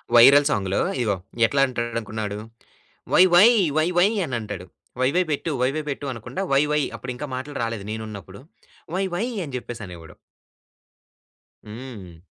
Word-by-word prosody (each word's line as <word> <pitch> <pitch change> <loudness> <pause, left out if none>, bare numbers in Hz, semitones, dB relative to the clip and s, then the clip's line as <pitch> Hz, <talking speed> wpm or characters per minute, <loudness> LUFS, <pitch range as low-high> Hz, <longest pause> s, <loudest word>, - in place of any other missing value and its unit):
Viral 140 +4 +8
సాంగ్‌లో 95 -7 0 0.2
ఇదిగో 105 -4 +1 0.3
ఎట్లా 135 +4 +1
అంటాడు 120 -2 -3
అనుకున్నాడు. 105 -1 -4 0.8
'వై, - - +8
వై, 190 +6 +9 0.3
వై, 155 +1 +3
వై' 180 +3 +6 0.2
అని 130 -5 -4
అంటాడు. 105 -5 -6 0.4
"వైవై 140 +8 +3
పెట్టు, 150 +3 -1
వైవై 140 +5 0
పెట్టు" 140 +1 -4
అనకుండా 120 - -5
'వై 135 +1 +5
వై' 150 -1 +2
అని 125 0 -6
ఇంకా 150 +3 -5
మాటలు 140 +3 -6
రాలేదు 115 -3 -4
నేనున్నప్పుడు. 105 -3 -7 0.5
"వై 190 - +1
వై" 200 +6 0 0.2
అని 140 -4 -7
చెప్పేసనేవాడు. 95 -10 -9 1.5
హ్మ్. 105 -7 -10
120 Hz, 140 wpm, -23 LUFS, 105-145 Hz, 1.5 s, వై